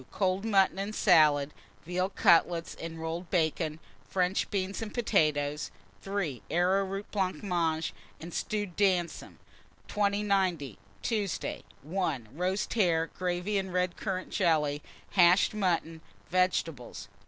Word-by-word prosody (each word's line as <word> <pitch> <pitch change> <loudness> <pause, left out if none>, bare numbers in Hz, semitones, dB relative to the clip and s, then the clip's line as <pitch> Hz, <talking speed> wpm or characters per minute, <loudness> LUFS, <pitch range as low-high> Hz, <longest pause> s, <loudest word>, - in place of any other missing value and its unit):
Cold 190 0 0
mutton 195 -3 +3
and 205 +2 -3
salad, 150 -6 +4 0.3
veal 180 +2 -1
cutlets 170 -2 +3
and 165 0 -7
rolled 165 +2 -4
bacon, 160 -3 0 0.3
French 185 0 0
beans 195 +1 -2
and 220 -2 -5
potatoes. 150 - +1 0.3
3. 195 - -3
Arrowroot 195 +3 0
blancmange 175 -4 -1 0.3
and 170 +1 -9
stewed 205 -5 -3
damsons. 185 -4 0 0.5
2090. 195 - 0 0.2
Tuesday. 210 -5 -2 0.2
1. 155 - -2
Roast 185 +5 -1
hare, 170 -7 +2
gravy, 180 +3 -1
and 190 -1 -4
red 180 -1 0
currant 185 -2 -4
jelly; 155 -6 +1 0.3
hashed 180 +1 +5
mutton, 170 -5 -1 0.3
vegetables. 165 - -1
180 Hz, 110 wpm, -29 LUFS, 160-195 Hz, 0.5 s, hashed